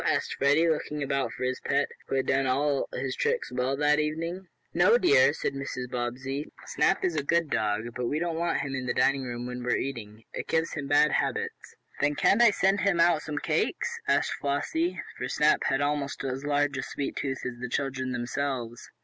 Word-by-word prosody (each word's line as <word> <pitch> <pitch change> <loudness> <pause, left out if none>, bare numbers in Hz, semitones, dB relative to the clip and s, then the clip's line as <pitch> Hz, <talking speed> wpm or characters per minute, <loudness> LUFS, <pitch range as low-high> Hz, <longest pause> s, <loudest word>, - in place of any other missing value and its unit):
asked - - 0
Freddie, 145 +4 +3
looking 150 -2 -1
about 140 0 -1
for - - -6
his 130 0 -1
pet, - - +1 0.2
who - - -2
had 135 - +1
done 135 0 +2
all 140 +2 +1
his 130 -1 -3
tricks 470 +1 -1
well 130 +2 -1
that 150 +1 +3
evening. 165 +5 -3 0.3
"No, 185 +7 +5
dear," 140 - +5
said 150 - -3
Mrs. 130 -2 -5
Bobbsey. 130 +4 -3
"Snap 195 - +1
is 175 -3 0
a 150 - +1
good 165 +1 +1
dog, 105 0 0
but 125 -1 -2
we 145 - -1
don't 170 0 -1
want 170 -3 0
him 140 -1 -4
in 130 -1 -3
the 120 - -1
dining 135 0 +3
room 120 -1 -5
when 125 0 -5
we 125 - 0
are - - +2
eating. 115 -5 -5
It - - -5
gives 160 0 0
him 145 -3 -4
bad 145 +1 +4
habits." - - -2 0.2
"Then 145 +1 +2
can't 205 +9 +4
I 235 - +8
send 195 -1 +2
him 185 -3 +2
out 170 -2 +4
some 150 -2 -5
cakes?" - - -1
asked - - +2
Flossie, 160 +5 -1 0.2
for 125 - -2
Snap 150 +3 +2
had 135 +1 +1
almost 145 -1 -1
as 135 0 -3
large 145 -1 +1
a - - -1
"sweet 140 0 -4
tooth" 135 -2 -3
as 125 -1 -5
the 125 - -4
children 130 -1 -2
themselves. 120 -1 -3
140 Hz, 210 wpm, -28 LUFS, 130-155 Hz, 0.3 s, I